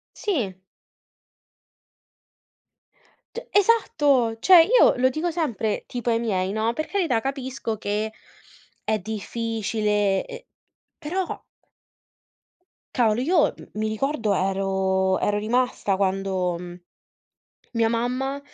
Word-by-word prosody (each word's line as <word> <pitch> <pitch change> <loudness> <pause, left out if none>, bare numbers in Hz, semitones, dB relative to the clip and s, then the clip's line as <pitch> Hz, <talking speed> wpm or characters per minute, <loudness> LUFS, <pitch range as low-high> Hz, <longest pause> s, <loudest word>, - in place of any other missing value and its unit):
Sì. 255 - -1 2.8
Cioè 480 - -7
esatto, 295 - +3
cioè 360 +2 +8
io 475 +8 +5
lo 255 +1 +3
dico 320 +6 -2
sempre 240 -10 -2
tipo 245 -1 -3
ai 230 - +2
miei, 190 -5 -1
no, 220 +2 0
per 310 - -3
carità 340 - +1
capisco 260 -3 -4
che 210 +1 -2 0.7
è 215 -1 0
difficile, 210 -1 -1
e - - -10 0.5
però 360 +4 -2 1.7
Cavolo, 235 -2 +2
io 325 +2 +3
m - - -12
mi 215 - 0
ricordo 220 -2 -1
ero 190 0 0
ero 205 0 0
rimasta 230 -3 0
quando, 190 -2 0
mhmm, 175 0 -9 0.9
mia 230 -1 +1
mamma 255 +4 -1
225 Hz, 105 wpm, -24 LUFS, 205-275 Hz, 2.8 s, cioè